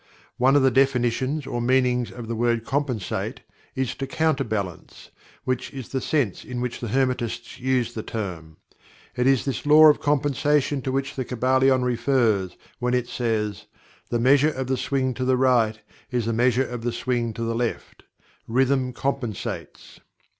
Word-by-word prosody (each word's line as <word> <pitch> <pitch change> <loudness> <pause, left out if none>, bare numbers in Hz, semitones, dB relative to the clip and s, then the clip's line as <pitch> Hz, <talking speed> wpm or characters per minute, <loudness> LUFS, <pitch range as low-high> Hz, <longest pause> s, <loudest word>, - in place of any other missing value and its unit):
One 130 +3 +4
of 145 - +5
the 130 - +4
definitions 130 +2 +1
or 120 - -3
meanings 125 -1 +2
of 120 -2 -8
the 115 - -3
word 115 0 0
"Compensate" 135 -8 -2 0.3
is, 130 -2 -1
"to 135 - -5
counterbalance" 130 - -2 0.3
which 130 0 -2
is 135 -4 -8
the 130 - -2
sense 130 - -1
in 125 -1 -5
which 125 -1 -3
the 120 - -4
Hermetists 125 -1 -1
use 125 -2 0
the 110 - -4
term. 85 -9 -6 0.6
It 125 +1 +1
is 135 -2 +3
this 135 -5 -3
Law 155 +1 +8
of 150 - +3
Compensation 145 0 +1
to 130 - -3
which 135 +2 -2
the 130 - -2
Kybalion 130 +1 +2
refers 115 -7 +1 0.2
when 125 +1 0
it 125 -1 0
says: 105 -4 -2 0.4
"The 120 - 0
measure 135 +5 +4
of 130 -3 -3
the 130 +1 0
swing 130 -1 -1
to 130 - -4
the 130 0 +2
right 120 -4 +2 0.3
is 120 -3 -1
the 115 - 0
measure 125 +3 +2
of 120 -1 -6
the 120 +1 -1
swing 120 0 -1
to 115 - -5
the 115 0 -1
left; 115 0 -3 0.5
rhythm 130 +1 +1
compensates." 125 -6 -4
125 Hz, 170 wpm, -24 LUFS, 115-135 Hz, 0.6 s, Law